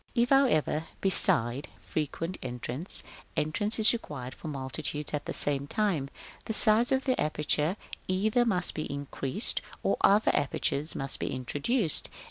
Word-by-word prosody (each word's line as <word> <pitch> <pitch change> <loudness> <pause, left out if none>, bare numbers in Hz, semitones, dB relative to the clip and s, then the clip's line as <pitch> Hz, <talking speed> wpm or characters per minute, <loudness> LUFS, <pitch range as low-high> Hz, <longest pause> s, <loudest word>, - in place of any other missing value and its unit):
§ - - -38
VI. 235 - +2
If, 245 - -2
however, 200 - +2
beside 145 - +4
frequent 165 +4 -5
entrance, 125 +6 +1 0.3
entrance 205 +8 +1
is 220 0 +7
required 135 - -7
for - - -11
multitudes 145 +1 -4
at 150 - -3
the - - -3
same 140 -1 -1
time, 175 -8 -1 0.4
the 220 - -3
size 225 +3 +3
of 265 0 +1
the 255 - 0
aperture 150 +3 -1 0.3
either 215 +6 +1
must 185 -6 +2
be 155 - -5
increased, 140 - -2 0.2
or - - 0
other 205 +2 +4
apertures 145 +2 -1
must 135 0 -1
be - - -3
introduced. 145 - 0
155 Hz, 150 wpm, -28 LUFS, 140-215 Hz, 0.4 s, is